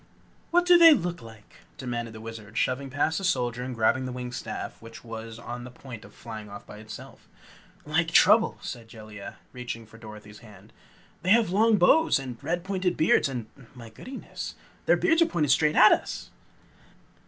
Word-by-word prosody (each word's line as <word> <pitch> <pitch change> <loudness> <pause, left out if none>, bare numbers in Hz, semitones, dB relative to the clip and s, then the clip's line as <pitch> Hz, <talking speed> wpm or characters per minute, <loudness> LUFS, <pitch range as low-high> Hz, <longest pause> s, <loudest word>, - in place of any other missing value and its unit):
"What 350 +1 +3
do 355 -1 +7
they 330 -2 +9
look 175 - -3
like?" 115 -2 -15 0.2
demanded 120 -3 -4
the 110 - -9
Wizard, 110 -1 -9
shoving 135 +2 0
past 145 +5 0
the - - -8
soldier 125 -9 0
and 125 0 -5
grabbing 115 +3 +2
the 130 - -4
winged 125 0 -6
staff - - -6
which 115 0 -12
was 115 -1 -8
on 120 +1 -7
the 125 - -8
point 125 -3 -11
of - - -14
flying 110 -2 -9
off 100 0 -10
by 105 - -11
itself. 110 0 -11 0.6
"Like 160 +3 +1
trouble!" 210 +6 +5
said 120 -3 -7
Jellia, 110 -3 -10 0.2
reaching 120 -2 -6
for 115 +1 -16
Dorothy's 105 -1 -12
hand. 105 -1 -16 0.5
"They 180 - -2
have 220 -2 +4
long 215 +3 +4
bows 320 - +4
and 130 -3 -7
pointed 185 +2 -3
red - - -14
beards 155 -2 +3
and 125 -4 -4 0.3
my 115 -2 -11
goodyness 260 - -8 0.3
their - - +5
beards 325 +1 +3
are 335 - +5
pointed 150 -6 0
straight 150 +2 +3
at 215 - +8
us!" - - -1
125 Hz, 185 wpm, -27 LUFS, 115-175 Hz, 0.6 s, they